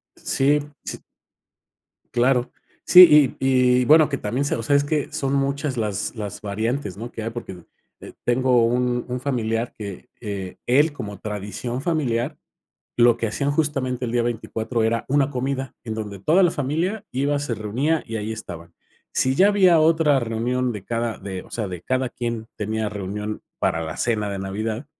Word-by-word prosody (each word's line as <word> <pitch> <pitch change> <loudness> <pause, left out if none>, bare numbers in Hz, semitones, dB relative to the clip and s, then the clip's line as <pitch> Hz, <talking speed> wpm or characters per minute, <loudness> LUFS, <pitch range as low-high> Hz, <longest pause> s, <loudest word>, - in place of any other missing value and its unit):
Sí, 145 +2 +2 0.2
sí. - - -6 1.1
Claro. 125 0 +2 0.3
Sí, 150 -7 +8
y 125 -1 +3
y - - 0
bueno 155 +1 +6
que 140 - -2
también 125 +5 -2
se - - 0
o 115 - -4
sea, 140 +6 +2
es 140 - +4
que 150 -1 -1
son 135 0 -1
muchas 140 0 0
las 105 0 -2
las 105 -3 -6
variantes, 110 +1 -2
¿no? 120 +2 -7
Que 110 - -6
hay 115 - -3
porque, 95 -7 -8 0.4
eh, - - -11
tengo 125 -1 +3
un 125 +1 0
un 125 0 -3
familiar 115 -3 -1
que, 100 +2 -8
eh, 100 -4 -5
él 145 +5 +4
como 100 -7 -7
tradición 105 +4 -4
familiar 140 -4 -1 0.6
lo 120 -1 +6
que 115 - -2
hacían 140 +7 -1
justamente 135 -4 -1
el 115 - -2
día 120 -1 +1
24 115 0 -2
era 115 +1 0
una 140 +1 +2
comida 135 0 -3
en 110 - -3
donde 105 -3 -6
toda 170 - +4
la 175 - +4
familia 170 +10 -2
iba, 140 +3 0
se 135 -5 -2
reunía 130 +10 -1
y 115 - -4
ahí 110 +1 -3
estaban. 85 -6 -9 0.4
Si 130 0 +2
ya 195 +5 +6
había 185 -5 +5
otra 155 -3 +4
reunión 120 +2 -1
de 100 -2 -7
cada 115 0 -2
de 95 -2 -6
o - - -18
sea, 105 -5 -3
de 90 -2 -6
cada 130 +4 -1
quien 115 -2 -4
tenía 110 0 -2
reunión 105 +1 -5 0.2
para 80 - 0
la 80 -1 -5
cena 110 -4 0
de 100 -1 -4
Navidad, 110 +6 -3
120 Hz, 180 wpm, -23 LUFS, 110-140 Hz, 1.1 s, Sí